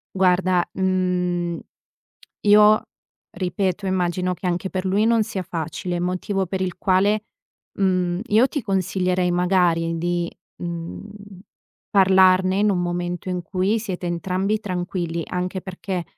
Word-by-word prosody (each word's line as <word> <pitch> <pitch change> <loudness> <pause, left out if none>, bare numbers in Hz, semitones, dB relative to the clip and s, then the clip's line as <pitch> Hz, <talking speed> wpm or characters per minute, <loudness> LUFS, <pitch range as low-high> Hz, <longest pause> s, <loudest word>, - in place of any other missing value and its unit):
Guarda, 185 -1 +3
mhmm, 180 -2 0 0.9
io, 210 +1 +6 0.5
ripeto 185 +1 -2
immagino 180 -1 0
che 180 - -6
anche 180 +2 -1
per 190 0 -3
lui 200 +3 +2
non 230 -1 +3
sia 200 -3 -4
facile, 175 +1 -4
motivo 185 +2 -1
per 190 +1 -3
il 180 -2 -3
quale, 200 +3 +2 0.5
mhmm, 185 -2 +1
io 230 +5 +4
ti 290 -6 -3
consiglierei 185 -2 0
magari 175 -2 +2
di, 175 0 -1 0.3
mhmm, 190 +4 -7 0.5
parlarne 185 -1 +5
in 210 0 +3
un 180 - 0
momento 175 0 -3
in 180 -1 -2
cui 190 +5 0
siete 190 -5 -5
entrambi 185 +5 -1
tranquilli, 175 -3 -3
anche 180 +1 -3
perché, 185 -1 -5
185 Hz, 125 wpm, -22 LUFS, 175-195 Hz, 0.9 s, io